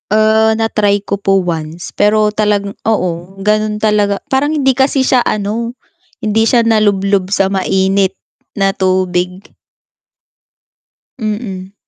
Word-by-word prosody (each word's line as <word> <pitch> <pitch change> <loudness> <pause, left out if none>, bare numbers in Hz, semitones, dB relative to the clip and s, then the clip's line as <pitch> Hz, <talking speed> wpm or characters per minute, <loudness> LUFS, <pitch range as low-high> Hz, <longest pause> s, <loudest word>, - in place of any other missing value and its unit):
Ah, 220 +1 +3
na-try 210 -2 +1
ko 200 - -2
po 195 -1 +2
once, 165 -1 -4
pero 210 +1 +2
talagang 205 -1 -1
oo, 185 -2 -2
ganun 210 +1 0
talaga, 205 -2 +1
parang 280 +3 +1
hindi 275 -3 +2
kasi 270 0 +2
siya 255 -1 +3
ano, 215 +3 -2 0.5
hindi 215 +1 +2
siya 235 +1 +3
nalublob 200 -3 +1
sa 195 -1 +2
mainit 190 0 +1 0.4
na 195 -1 +1
tubig. 185 -1 -1 1.8
Mm. 205 -4 -5
205 Hz, 115 wpm, -14 LUFS, 190-220 Hz, 1.8 s, Ah